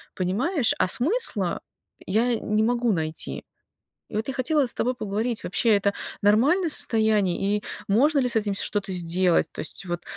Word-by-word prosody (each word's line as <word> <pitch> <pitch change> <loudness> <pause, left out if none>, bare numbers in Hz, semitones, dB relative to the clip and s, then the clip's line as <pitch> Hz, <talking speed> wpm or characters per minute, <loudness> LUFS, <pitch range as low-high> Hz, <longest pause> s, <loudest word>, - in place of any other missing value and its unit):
понимаешь, 235 - 0
а - - +2
смысла 245 - +2 0.5
я 230 +5 +1
не 215 +1 0
могу 240 0 +1
найти. 160 -2 -3 0.7
И - - -12
вот 220 +4 -3
я 265 - -3
хотела 285 +1 +1
с - - -4
тобой 250 +1 -1
поговорить, 220 +1 -3
вообще 220 +4 +2
это 200 0 0 0.3
нормальное 280 - +3
состояние 210 - +1
и - - -13 0.2
можно 280 +9 +3
ли 250 - 0
с 230 - -1
этим 205 -2 0
что-то 195 -1 -3
сделать? 175 0 +1
То - - -16
есть 165 - -5
вот 175 0 -4
215 Hz, 165 wpm, -24 LUFS, 195-250 Hz, 0.7 s, нормальное